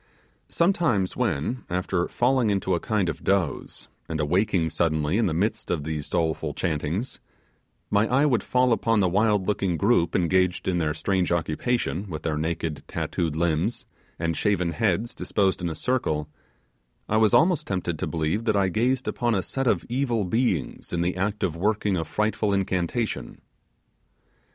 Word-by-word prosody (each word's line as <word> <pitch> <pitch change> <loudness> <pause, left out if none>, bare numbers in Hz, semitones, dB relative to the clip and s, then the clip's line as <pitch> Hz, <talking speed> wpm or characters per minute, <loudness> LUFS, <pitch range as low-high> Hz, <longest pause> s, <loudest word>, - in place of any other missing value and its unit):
Sometimes 165 - +1
when, 115 - -1
after 90 0 -1
falling 125 -2 +2
into 95 -2 0
a 85 - +1
kind 105 -2 0
of 85 - -4
doze, 95 -7 -1 0.2
and 80 - -2
awaking 90 +1 +1
suddenly 80 -1 +1
in 115 - +2
the - - 0
midst 100 +6 -1
of 85 -5 -1
these 75 -1 -4
doleful 80 -3 -1
chantings, 85 - -2 0.7
my 105 +2 +3
eye 135 +5 +3
would 130 -6 +2
fall 125 -1 +2
upon 115 -1 +1
the 95 - +3
wild 105 +1 +2
looking 95 -4 0
group 100 -3 +2
engaged 90 +1 +1
in 90 -2 +1
their 75 -2 0
strange 95 +1 0
occupation, 85 +4 -1
with 75 -3 -6
their 80 -2 -1
naked 80 0 -2
tattooed 80 -4 -2
limbs, 85 +6 0 0.3
and 85 0 -1
shaven 90 -3 +1
heads 105 +6 0
disposed 95 -3 0
in 85 - -1
a 80 - -4
circle, 80 - -1 0.8
I 110 - +1
was 110 -2 +4
almost 170 -1 +3
tempted 90 -4 -2
to - - -2
believe 80 +7 -1
that 110 -3 +2
I 100 -2 +2
gazed 125 +6 0
upon 120 -2 0
a 95 - 0
set 135 -1 -2
of - - +1
evil 120 -3 0
beings 100 - -1
in 85 - -1
the 90 +1 0
act 100 +3 -2
of 85 - 0
working 105 +3 0
at 85 - 0
a - - -5
frightful 105 +3 0
incantation. 95 +4 -2
95 Hz, 170 wpm, -25 LUFS, 85-110 Hz, 0.8 s, was